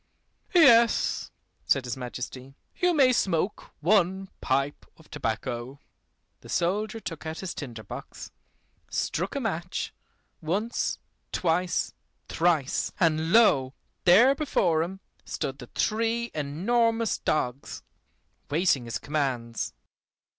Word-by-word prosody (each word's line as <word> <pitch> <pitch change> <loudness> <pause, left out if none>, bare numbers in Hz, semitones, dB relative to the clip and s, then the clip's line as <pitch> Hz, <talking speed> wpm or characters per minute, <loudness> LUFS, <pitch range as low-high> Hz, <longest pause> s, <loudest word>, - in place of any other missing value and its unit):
"Yes," 235 -8 +5 0.4
said 135 -2 +2
his 120 - -3
Majesty, 130 +1 -7 0.2
"you 360 -1 +2
may 270 -6 +5
smoke 190 -2 0
one 190 +1 +2
pipe 140 +2 -1
of 160 - -20
tobacco." 120 0 -3 0.6
The - - -14
soldier 210 +6 0
took 165 -7 -7
out 160 +1 -5
his 190 -2 -4
tinder 120 -7 -7
box, 95 - -9 0.6
struck 180 - -2
a - - 0
match, 180 -7 -3 0.5
once, 200 +9 -1 0.3
twice, 175 +1 0 0.3
thrice, 160 -5 +1
and 160 -1 +2
lo! 140 - +5 0.3
there 225 +10 +7
before 185 - +1
him 190 +4 -4 0.2
stood 135 +1 -4
the 125 - -9
three 230 - 0
enormous 225 +10 +1
dogs, 135 -3 -2 0.7
waiting 145 -5 +2
his 115 -2 -3
commands. 125 -5 -2
165 Hz, 110 wpm, -27 LUFS, 135-215 Hz, 0.7 s, there